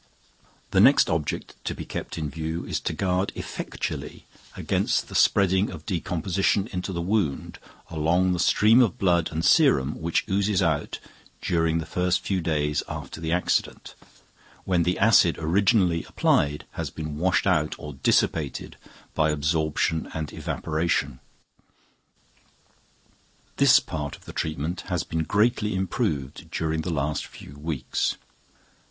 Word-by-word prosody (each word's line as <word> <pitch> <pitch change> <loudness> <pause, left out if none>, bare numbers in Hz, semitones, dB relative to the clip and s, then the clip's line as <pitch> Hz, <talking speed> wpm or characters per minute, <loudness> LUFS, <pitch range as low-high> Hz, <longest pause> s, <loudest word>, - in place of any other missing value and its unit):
The - - +3
next - - +6
object 80 -2 -2
to - - -3
be - - -7
kept - - -6
in 80 -2 -2
view 80 +3 -4
is - - -2
to - - -3
guard 95 0 0
effectually - - -5 0.3
against - - 0
the - - -10
spreading 95 0 +3
of 80 -4 -9
decomposition 95 +3 0
into 90 +1 -3
the 85 -2 -3
wound 95 -6 -1 0.3
along 85 +4 +1
the 90 - -2
stream 110 +7 +5
of 115 -8 +1
blood 85 -3 +2
and 80 +1 -2
serum 70 +4 +3
which 85 +1 0
oozes 100 0 +1
out 80 -5 0 0.4
during 80 -1 +1
the 80 - -3
first 90 +1 0
few 95 -2 -1
days 75 -2 0
after 80 - -7
the 80 -1 -2
accident, 90 +1 -1 0.7
when 90 -2 +1
the 90 +2 +1
acid 100 -5 +5
originally 90 +1 +2
applied 75 +1 +1
has - - -4
been 75 -1 -6
washed 90 +1 +2
out 75 0 +1
or 75 -1 -8
dissipated 70 +2 0 0.4
by 80 -1 +2
absorption 80 +1 0
and 80 -2 -4
evaporation. 80 -5 -2 2.4
This - - +7
part 75 -2 -5
of - - -19
the - - -9
treatment 80 +3 -3
has 90 -3 -1
been 80 -1 -2
greatly 105 0 +1
improved 95 - -2
during 80 0 -1
the 85 - -3
past 75 -1 -2
few 70 - -12
weeks. 75 -4 -2
85 Hz, 140 wpm, -25 LUFS, 75-95 Hz, 2.4 s, This